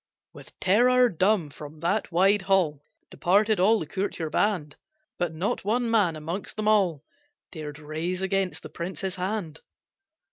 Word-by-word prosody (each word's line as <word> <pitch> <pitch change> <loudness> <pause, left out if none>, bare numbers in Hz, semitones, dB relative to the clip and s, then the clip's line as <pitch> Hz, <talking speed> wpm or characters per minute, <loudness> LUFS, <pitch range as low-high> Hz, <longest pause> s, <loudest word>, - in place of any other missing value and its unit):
With - - -14
terror 245 +6 +4
dumb, 185 -3 +1
from 150 +1 -11
that 195 +5 0
wide 195 +4 +4
hall 185 -7 +1 0.3
Departed 210 +3 +2
all 215 +5 +5
the 165 - -4
courtier 165 -2 -3
band, 170 -7 0 0.4
But 175 -2 0
not 180 +6 -2
one 230 +3 0
man 200 -8 +3
amongst 165 +6 -5
them 215 -1 -2
all 185 -9 +2 0.5
Dared 150 -3 -7
raise 160 +5 -4
against 190 -1 -1
the - - -8
prince 175 +3 -6
his 190 -1 -3
hand. 180 -4 -3
185 Hz, 150 wpm, -26 LUFS, 160-205 Hz, 0.5 s, all